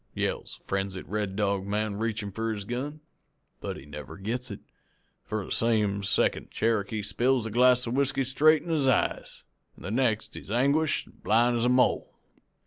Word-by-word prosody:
yells - - -2
the - - -32
frenzied 95 -1 -2
Red 105 -1 -3
Dog 100 -2 0
man, 105 0 -1
reachin' 110 -2 -2
for 115 +3 -2
his 100 -2 -5
gun. 140 +7 -4 0.6
"But - - -5
he 65 - -11
never 75 -3 -9
gets 120 +6 -3
it, 100 - -7 0.6
for 105 -2 -3
the - - -10
same 105 -3 +1
second 100 - +1
Cherokee 110 -1 0
spills 125 +4 +1
the 115 - -5
glass 125 +2 +4
of 115 - -3
whiskey 135 0 +1
straight 150 +4 +4
in 175 - -8
his 150 -5 +1
eyes, 130 - 0 0.3
an' - - -14
the 95 - -4
next 115 -2 0
he's - - -9
anguished 140 +7 +2
an' - - -21
blind 120 +3 +3
as 115 - +1
a - - +3
mole. 125 0 +2
115 Hz, 185 wpm, -28 LUFS, 100-125 Hz, 0.6 s, glass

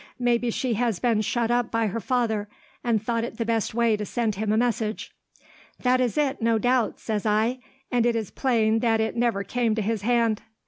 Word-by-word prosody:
Maybe 245 -1 +1
she 245 +1 -1
has 230 -2 0
been 225 +1 +1
shut 235 +2 0
up 240 -1 +1
by 230 0 0
her 215 +2 -2
father, 220 -2 -1 0.3
and 235 -3 +2
thought 230 +2 -1
it 235 - -6
the 230 - -1
best 225 -1 -1
way 235 -2 +3
to 210 - -4
send 225 +1 -1
him 210 +2 -2
a 215 - +2
message.' 225 -2 -1 0.7
"'That 255 0 +3
is 245 +2 0
it, 280 -3 0
no 230 0 +3
doubt,' 245 0 +1
says 215 -2 -2
I; 220 +4 +1 0.3
'and 245 -2 +2
it 235 - +1
is 220 -4 -3
plain 225 -4 +1
that 225 -1 +2
it 220 0 -1
never 235 -4 +1
came 235 -1 0
to 220 - -1
his 220 0 -1
hand.' 230 -1 +1
230 Hz, 215 wpm, -25 LUFS, 220-240 Hz, 0.7 s, way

